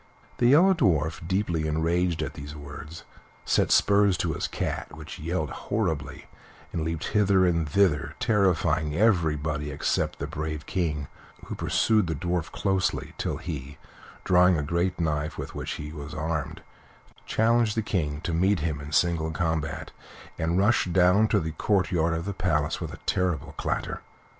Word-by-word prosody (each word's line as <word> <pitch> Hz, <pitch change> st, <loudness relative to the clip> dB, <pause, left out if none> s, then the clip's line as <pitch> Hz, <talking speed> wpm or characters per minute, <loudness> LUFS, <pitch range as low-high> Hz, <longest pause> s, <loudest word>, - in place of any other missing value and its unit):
The 120 Hz, -, +4 dB
Yellow 170 Hz, +9 st, +6 dB
Dwarf, 80 Hz, -, +1 dB
deeply 90 Hz, -4 st, 0 dB
enraged 85 Hz, +2 st, 0 dB
at -, -, -4 dB
these 70 Hz, +2 st, -8 dB
words, 75 Hz, +2 st, -9 dB, 0.4 s
set -, -, +2 dB
spurs 100 Hz, -2 st, +4 dB
to -, -, -1 dB
his -, -, -2 dB
cat, -, -, -3 dB
which -, -, -9 dB
yelled 80 Hz, -2 st, -2 dB
horribly, 75 Hz, -9 st, -3 dB, 0.5 s
and 85 Hz, -, -1 dB
leaped 80 Hz, 0 st, -3 dB
hither 100 Hz, -3 st, +3 dB
and 85 Hz, -3 st, +1 dB
thither 85 Hz, -3 st, +2 dB
terrifying 85 Hz, -9 st, +2 dB
everybody 80 Hz, -7 st, +1 dB
except 70 Hz, -, -1 dB
the -, -, -3 dB
brave 75 Hz, 0 st, -4 dB
King, 75 Hz, -6 st, -2 dB, 0.4 s
who -, -, -6 dB
pursued 110 Hz, -4 st, +2 dB
the 80 Hz, -, -1 dB
Dwarf 85 Hz, +2 st, -2 dB
closely, 95 Hz, -2 st, -1 dB
till -, -, -2 dB
he, 75 Hz, -3 st, -6 dB, 0.5 s
drawing 90 Hz, -1 st, +5 dB
a 75 Hz, -, -1 dB
great 85 Hz, +5 st, -1 dB
knife 75 Hz, -1 st, -1 dB
with -, -, -6 dB
which -, -, -4 dB
he 75 Hz, 0 st, -6 dB
was 75 Hz, -1 st, -7 dB
armed, 80 Hz, -2 st, -3 dB, 0.6 s
challenged 115 Hz, -1 st, +2 dB
the 110 Hz, -, +1 dB
King 75 Hz, -8 st, -2 dB
to 85 Hz, -, -3 dB
meet 95 Hz, +2 st, +2 dB
him 75 Hz, -2 st, -2 dB
in 70 Hz, +1 st, -8 dB
single 85 Hz, -1 st, +2 dB
combat, 80 Hz, -2 st, -2 dB, 0.5 s
and 80 Hz, +2 st, 0 dB
rushed 100 Hz, -3 st, +2 dB
down 90 Hz, 0 st, +5 dB
into 110 Hz, +1 st, +3 dB
the 80 Hz, 0 st, -3 dB
courtyard 85 Hz, -1 st, +1 dB
of 85 Hz, +1 st, -4 dB
the 100 Hz, -, -3 dB
palace 75 Hz, -6 st, 0 dB
with -, -, -4 dB
a -, -, -8 dB
terrible 85 Hz, -5 st, 0 dB
clatter. -, -, -3 dB
85 Hz, 160 wpm, -26 LUFS, 75-95 Hz, 0.6 s, Yellow